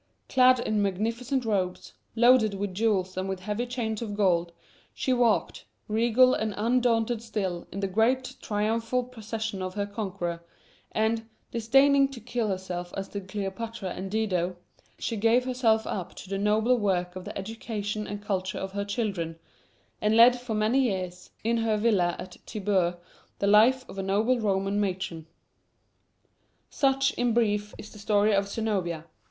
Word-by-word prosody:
Clad 255 -1 +5
in 215 -3 0
magnificent 230 +7 -1
robes, 190 -4 -2 0.2
loaded 235 -3 +5
with 195 -1 -3
jewels 190 -3 0
and 190 +1 -2
with 190 -1 -4
heavy 210 +5 -2
chains 230 -3 -3
of 210 -3 -4
gold, 175 -4 +2 0.4
she 260 - 0
walked, 235 -7 +1 0.2
regal 235 +4 +4
and 215 -2 -1
undaunted 235 0 +1
still, 195 -6 -3
in 200 - -5
the 195 - 0
great 235 +6 +1
triumphal 225 +4 0
procession 220 -4 -5
of 185 0 -4
her 205 -1 -1
conqueror, 190 -5 -4 0.5
and, 225 +1 0 0.2
disdaining 275 +4 +4
to 270 -3 -10
kill 235 0 -2
herself 185 -2 -4
as 195 0 -4
did 200 -2 -6
Cleopatra 200 +1 -4
and 190 +2 -5
Dido, 185 -4 0 0.4
she 230 - -3
gave 230 +4 +3
herself 235 -4 +2
up 185 -4 -4
to 185 - -10
the 195 - -1
nobler 215 +4 +3
work 185 -5 0
of 185 - -6
the - - -7
education 210 0 -4
and 205 0 -6
culture 190 -2 -2
of 190 - -4
her 200 +1 -2
children, 200 -6 -3 0.6
and 215 +1 +3
led 240 +2 +8
for 245 -3 -4
many 215 +5 +2
years, 185 -6 -2
in 230 +1 +1
her 225 -1 +1
villa 205 -6 +2
at 180 -1 -9
Tibur, 190 -4 0 0.4
the - - -1
life 230 +6 +5
of 195 - -8
a - - 0
noble 215 +6 +1
Roman 195 -1 0
matron. 185 -5 -3 1.4
Such, 270 -1 +2
in 240 -2 +2
brief, 210 -3 +1
is 210 - -10
the 210 - -12
story 210 0 +2
of 200 0 +2
Zenobia. 190 -7 -2
210 Hz, 160 wpm, -27 LUFS, 195-230 Hz, 1.4 s, led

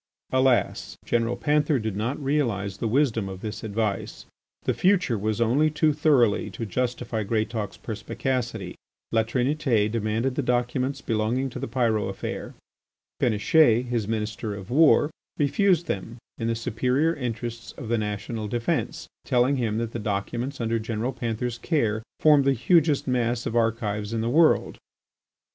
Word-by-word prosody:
Alas! 130 -1 +1
General 120 0 0
Panther 150 0 +2
did 110 -4 -3
not 115 +7 -2
realise 115 -9 -1
the 115 - -2
wisdom 115 -5 +1
of 95 0 -8
this 110 0 -5
advice. 105 -2 -3 0.4
The - - +1
future 185 -9 +2
was 110 +1 -1
only 130 +7 +3
too 155 0 +2
thoroughly 140 -8 +3
to 115 - -3
justify 120 +1 -2
Greatauk's 110 -1 -2
perspicacity. 120 +3 -3 0.4
La 115 - +3
Trinité 120 -2 +1
demanded 115 +3 0
the 145 - -1
documents 125 +2 0
belonging, 115 +4 -1
to - - -6
the - - -3
Pyrot 115 -3 +1
affair. - - -5 0.7
Péniche, 120 +2 +4
his 120 -4 -2
Minister 110 -1 -3
of 100 +3 -9
War, 150 +1 +5 0.3
refused 175 +4 +2
them 115 - -4 0.2
in 115 - -1
the 115 - 0
superior 125 +7 +1
interests 120 -3 -5
of 125 - -8
the 115 0 +1
national 105 +1 -3
defence, 115 +2 -2 0.2
telling 130 +2 +2
him 110 -4 -1
that 115 -1 -2
the 120 - -4
documents 115 +6 -3
under 115 -1 0
General 115 +3 -2
Panther's 120 0 -3
care 115 -10 0 0.2
formed 150 -3 +5
the 135 - +4
hugest 150 +3 +2
mass 120 -2 0
of 115 - -3
archives 115 -2 0
in 115 - 0
the 115 +1 -1
world. 160 +3 +3
120 Hz, 150 wpm, -25 LUFS, 110-135 Hz, 0.7 s, War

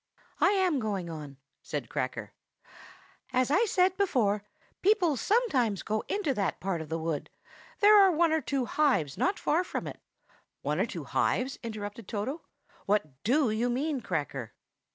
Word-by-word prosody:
"I - - +5
am 370 -7 +2
going 195 -7 -3
on," 150 -4 -8 0.2
said - - -4
Cracker. - - -4 1.0
"As 255 +1 +1
I 395 +9 +4
said 370 -2 +2
before, 235 - +2 0.4
people 370 -6 +3
sometimes 260 - +1
go 215 0 -1
into 400 -9 0
that 200 -6 -1
part 185 -3 -2
of 155 - -8
the 165 - -1
wood; 160 -2 -3 0.5
there 420 +1 +8
are 385 -1 +6
one 335 0 +3
or 320 0 +2
two 275 -4 -1
hives 250 - +1
not 390 +2 +1
far 330 +4 +1
from - - -4
it." - - -7 0.6
"One - - -1
or - - +2
two - - -6
hives?" 260 +2 0
interrupted 215 -2 -6
Toto. 235 +9 -3 0.5
"What 155 -10 0
do 255 +1 +3
you 230 +3 0
mean, 275 +2 -1
Cracker?" 145 - -3
245 Hz, 160 wpm, -29 LUFS, 200-330 Hz, 1.0 s, there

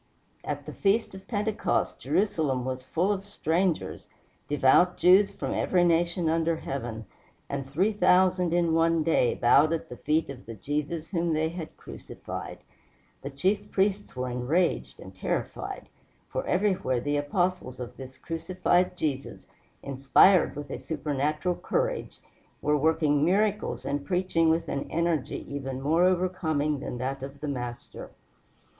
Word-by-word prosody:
At - - -4
the - - -7
feast 205 +2 +1
of 190 0 -11
Pentecost 210 -1 -1
Jerusalem 155 -11 0
was 130 0 -3
full 175 +9 0
of 195 -1 -2
strangers, 180 -3 -1 0.4
devout 145 +5 +4
Jews 190 +3 +6
from - - -4
every 180 -2 +2
nation 170 0 +2
under 165 +1 +1
heaven, 120 -7 -5 0.4
and 135 -1 -4
three 185 +10 +1
thousand 185 -2 +3
in 170 -1 +2
one 165 0 +3
day 155 -6 +2
bowed 140 +6 +4
at 165 - -4
the 125 - -8
feet 155 +2 0
of 130 -3 -12
the 115 - -7
Jesus 150 - -3
whom 170 -3 0
they 155 +1 +1
had 165 -1 -8
crucified. - - -8 0.6
The 140 - -5
chief 185 +9 -1
priests 200 -1 0
were 125 0 -2
enraged 140 +9 0
and - - -11
terrified, - - -4 0.4
for - - -3
everywhere 185 -10 +1
the 145 +4 -1
Apostles 145 -2 -1
of 125 0 -7
this 130 0 -10
crucified 180 +2 0
Jesus, 140 -5 -3 0.4
inspired 140 +8 +4
with 145 -1 -7
a - - -4
supernatural 150 +4 -1
courage, - - -2 0.4
were 150 - +1
working 150 -1 +2
miracles 205 +5 +1
and 140 0 -2
preaching 180 -1 +1
with 165 +1 +1
an 140 - -3
energy 165 -4 -1
even 135 -2 -5
more 160 +6 +3
overcoming 165 -5 0
than 125 - -5
that 135 +2 -3
of 135 +1 -8
the 150 - -5
Master. 125 -4 -6
160 Hz, 145 wpm, -27 LUFS, 140-180 Hz, 0.6 s, Jews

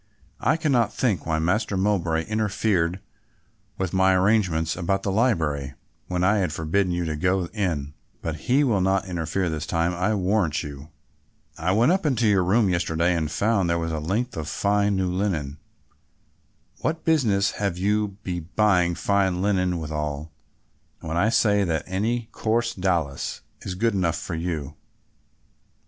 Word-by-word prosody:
I - - +2
cannot 140 -8 +2
think 105 - -1
why 80 -1 +1
Master 95 +5 0
Mowbray 90 -5 +1
interfered 100 -4 0 0.8
with 95 -3 -2
my 95 0 +4
arrangements 90 -5 +2
about 95 +2 -1
the 100 - -1
library, 80 - 0 0.3
when 90 0 -1
I 100 +3 +4
had 90 -5 0
forbidden 85 +5 0
you 85 0 -1
to 80 -1 -2
go 90 +3 +1
in, 80 -9 -2 0.3
but 80 -1 -4
he 135 +4 +4
will 110 -8 +2
not 95 +1 +1
interfere 90 0 -2
this 80 -1 -3
time 85 +1 0
I'll 100 +5 0
warrant 90 -4 +1
you. 70 +1 -9 0.7
"I 85 +3 -1
went 115 +9 +4
up 190 +2 +1
into 130 -7 +1
your 100 -3 +4
room 100 +4 +3
yesterday 85 -1 +1
and 80 -3 -1
found 100 +1 +1
there 85 - +2
a 80 -1 -2
length 110 +10 -2
of 80 -2 -4
fine 100 +3 +1
new 95 -1 0
linen. 80 -7 -2 1.2
What 160 +1 -2
business 110 -12 +2
have 100 -4 0
you 105 +3 +1
to 100 - -12
be 90 -2 -3
buying 90 0 +2
fine 95 -2 +1
linen 90 -2 +1
withal, 75 -1 -4 0.7
when 80 0 -4
I 100 +6 +3
say 105 -3 +3
that 80 -4 -1
any 110 +5 -1
coarse 115 +1 0
dowlas 85 -7 -1 0.2
is 90 - -5
good 115 +4 +1
enough 90 -4 0
for - - -6
you? 80 -4 -3
95 Hz, 160 wpm, -24 LUFS, 80-105 Hz, 1.2 s, my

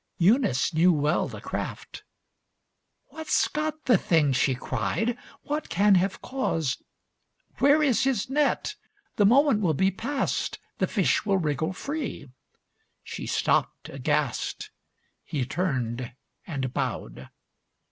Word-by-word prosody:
Eunice 185 - +3
knew 170 +3 +5
well 150 0 +1
the - - -8
craft - - -6 1.1
"What's 315 0 0
got 310 0 -3
the 245 -7 +5
thing!" 150 -5 +2
She 130 0 +2
cried. 130 - -1 0.3
"What 300 +1 -3
can 200 +5 +4
have 190 +1 +1
caused 165 - -1 0.8
Where 290 +2 +5
is 265 -3 +3
his 260 -6 0
net? 290 +2 0 0.4
The 205 - +5
moment 270 -1 +4
will 165 -6 +1
be 190 +6 +2
past. 265 +8 -2 0.2
The - - +2
fish - - +1
will 200 -2 +2
wriggle 160 0 -1
free." 280 - -5 0.7
She - - -6
stopped - - 0
aghast. - - -2 0.5
He 140 -5 -2
turned 125 -7 -2 0.3
and 135 -6 -3
bowed. - - -4
190 Hz, 120 wpm, -26 LUFS, -, 1.1 s, knew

